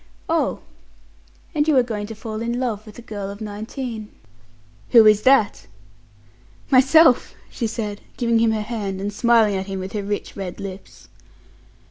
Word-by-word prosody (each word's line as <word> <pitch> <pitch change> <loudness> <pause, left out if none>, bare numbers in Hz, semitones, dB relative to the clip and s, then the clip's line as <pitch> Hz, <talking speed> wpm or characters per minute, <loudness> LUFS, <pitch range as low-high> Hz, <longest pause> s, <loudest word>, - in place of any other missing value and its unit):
"Oh! - - 0 0.9
And 295 0 +1
you 300 -4 +4
are 255 - +5
going 210 -3 -4
to 225 - -8
fall 215 +1 -6
in 235 +1 -2
love 225 -4 -3
with 215 - -12
a 240 - -10
girl 205 -3 -6
of 200 +1 -8
nineteen." 220 +1 -6 0.8
"Who 230 -2 +9
is 215 -1 +6
that?" 260 -4 +3 1.0
"Myself!" 270 +1 +5 0.2
she 235 - -2
said, 215 -2 -5 0.2
giving 235 -2 +2
him 230 0 +3
her 220 -1 -1
hand 210 -4 -4
and 205 +1 -3
smiling 225 -1 +3
at 190 +1 -4
him 195 -1 -4
with 185 +1 -6
her 210 - -2
rich 205 +1 -4
red 190 -2 -6
lips. 195 -1 -9
215 Hz, 165 wpm, -22 LUFS, 205-235 Hz, 1.0 s, Who